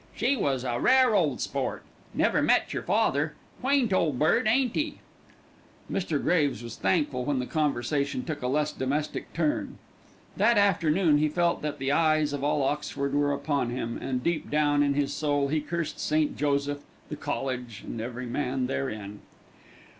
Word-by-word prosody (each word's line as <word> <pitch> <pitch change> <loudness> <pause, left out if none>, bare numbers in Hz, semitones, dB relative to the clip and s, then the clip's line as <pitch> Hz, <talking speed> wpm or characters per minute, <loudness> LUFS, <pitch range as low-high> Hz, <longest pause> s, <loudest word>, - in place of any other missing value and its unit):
"She 245 +6 +2
was 135 - 0
a 120 -2 -1
rare 255 - +5
ole 155 - +2
sport. - - -3 0.3
Never - - +2
met - - +2
yer - - -2
father. 145 +3 +1 0.3
Quaint 260 -5 +2
ole 165 -5 +2
bird, 155 - +2
ain't 245 +2 +2
'e?" 300 -1 -1 0.9
Mr. 165 -6 -1
Graves 145 -10 +1
was 115 - -7
thankful 145 -8 0
when 140 +1 0
the 125 - -1
conversation 140 -2 -1
took 155 -3 -4
a 125 - -1
less 150 +3 0
domestic 145 +3 -2
turn. 155 -2 -1 0.6
That 235 -2 +4
afternoon 170 -5 +3
he 155 0 +2
felt 170 +2 +1
that 150 -1 -3
the 135 0 -1
eyes 155 -1 +2
of 140 -1 -3
all 145 -1 +1
Oxford 140 0 -2
were 145 0 +2
upon 140 -3 -1
him, 120 -1 -3
and 125 -1 -3
deep 170 -2 -1
down 145 -1 +2
in 140 -1 +2
his 145 -1 0
soul 145 -2 0
he 155 +1 +1
cursed 170 0 -4
St. 155 0 +1
Joseph, 145 0 0 0.3
the 150 - -4
college, 130 -6 -4
and 115 - -5
every 120 +2 -5
man 130 +1 -1
therein. 110 -6 -4
145 Hz, 170 wpm, -27 LUFS, 135-160 Hz, 0.9 s, rare